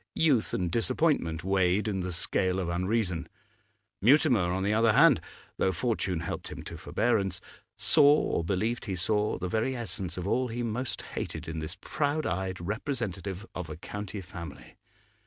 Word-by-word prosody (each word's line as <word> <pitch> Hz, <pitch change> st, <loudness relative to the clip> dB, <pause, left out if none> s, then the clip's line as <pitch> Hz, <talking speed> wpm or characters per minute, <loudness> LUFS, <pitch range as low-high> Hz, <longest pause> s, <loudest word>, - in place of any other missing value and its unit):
Youth 140 Hz, -9 st, +3 dB
and 90 Hz, -2 st, -1 dB
disappointment 115 Hz, -, +1 dB
weighed 95 Hz, +2 st, +2 dB
in 100 Hz, -3 st, -1 dB
the 90 Hz, 0 st, -3 dB
scale 90 Hz, +2 st, +2 dB
of 90 Hz, -2 st, -2 dB
unreason. 90 Hz, 0 st, 0 dB, 0.7 s
Mutimer, 120 Hz, -, +4 dB
on 95 Hz, +1 st, -1 dB
the 105 Hz, +2 st, +2 dB
other 115 Hz, 0 st, +4 dB
hand, 150 Hz, +1 st, +6 dB, 0.4 s
though 95 Hz, -, +2 dB
fortune 95 Hz, -3 st, -1 dB
helped 85 Hz, -, -4 dB
him -, -, -7 dB
to -, -, -8 dB
forbearance, 100 Hz, -6 st, 0 dB, 0.4 s
saw, 145 Hz, -2 st, +6 dB
or 85 Hz, -, 0 dB
believed 105 Hz, +7 st, -1 dB
he 95 Hz, -4 st, -2 dB
saw, 105 Hz, +4 st, 0 dB
the 90 Hz, -, -3 dB
very 110 Hz, +7 st, 0 dB
essence 95 Hz, -7 st, -3 dB
of 90 Hz, +1 st, -3 dB
all 125 Hz, +5 st, +1 dB
he 120 Hz, +1 st, -3 dB
most 120 Hz, +3 st, -3 dB
hated -, -, -5 dB
in 80 Hz, 0 st, -4 dB
this 80 Hz, +3 st, -6 dB
proud 150 Hz, +1 st, -1 dB
eyed 95 Hz, +1 st, -2 dB
representative 100 Hz, -1 st, -3 dB
of 90 Hz, -3 st, -5 dB
a 75 Hz, -, -6 dB
county 105 Hz, +3 st, -6 dB
family. 90 Hz, -2 st, -9 dB
100 Hz, 165 wpm, -29 LUFS, 90-120 Hz, 0.7 s, hand